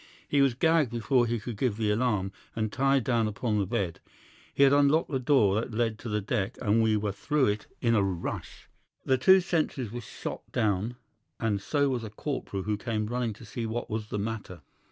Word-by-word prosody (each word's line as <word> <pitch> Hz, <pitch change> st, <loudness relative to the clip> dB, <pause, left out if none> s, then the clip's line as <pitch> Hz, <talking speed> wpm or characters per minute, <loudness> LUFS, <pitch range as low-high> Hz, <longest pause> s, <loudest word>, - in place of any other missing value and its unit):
He 145 Hz, -, +3 dB
was 135 Hz, -3 st, +3 dB
gagged 160 Hz, -1 st, +3 dB
before 120 Hz, +2 st, +1 dB
he 115 Hz, 0 st, -1 dB
could 110 Hz, +1 st, -6 dB
give 110 Hz, -2 st, 0 dB
the 110 Hz, -2 st, +1 dB
alarm, 105 Hz, -4 st, 0 dB, 0.2 s
and 110 Hz, -2 st, -2 dB
tied 135 Hz, -1 st, +2 dB
down 115 Hz, -2 st, +1 dB
upon 105 Hz, 0 st, -1 dB
the 100 Hz, -, 0 dB
bed. 90 Hz, -3 st, -2 dB, 0.5 s
He 140 Hz, -, +3 dB
had 140 Hz, 0 st, +6 dB
unlocked 145 Hz, +3 st, +3 dB
the 135 Hz, -, 0 dB
door 115 Hz, -7 st, +3 dB
that 115 Hz, -, -6 dB
led 115 Hz, -1 st, 0 dB
to 120 Hz, -, -6 dB
the 105 Hz, 0 st, 0 dB
deck, 105 Hz, +2 st, -2 dB
and 110 Hz, 0 st, +2 dB
we 110 Hz, -1 st, +3 dB
were 105 Hz, -1 st, -1 dB
through 145 Hz, +7 st, +1 dB
it 105 Hz, +1 st, -3 dB
in 115 Hz, -1 st, +3 dB
a 110 Hz, -, +4 dB
rush. 95 Hz, -3 st, -4 dB, 0.4 s
The 130 Hz, -1 st, +2 dB
two 190 Hz, +8 st, +7 dB
sentries 155 Hz, -, -1 dB
were 120 Hz, +1 st, -5 dB
shot -, -, -6 dB
down, 105 Hz, +2 st, 0 dB, 0.4 s
and 110 Hz, -5 st, 0 dB
so 145 Hz, +5 st, +1 dB
was 125 Hz, -3 st, -2 dB
a 110 Hz, -, -5 dB
corporal 105 Hz, -4 st, -4 dB
who 105 Hz, +1 st, -1 dB
came 110 Hz, 0 st, -2 dB
running 120 Hz, 0 st, -2 dB
to -, -, -13 dB
see 115 Hz, -2 st, -4 dB
what 115 Hz, +1 st, -4 dB
was 110 Hz, -1 st, -3 dB
the 105 Hz, -, -3 dB
matter. 100 Hz, -5 st, -4 dB
115 Hz, 215 wpm, -28 LUFS, 105-130 Hz, 0.5 s, two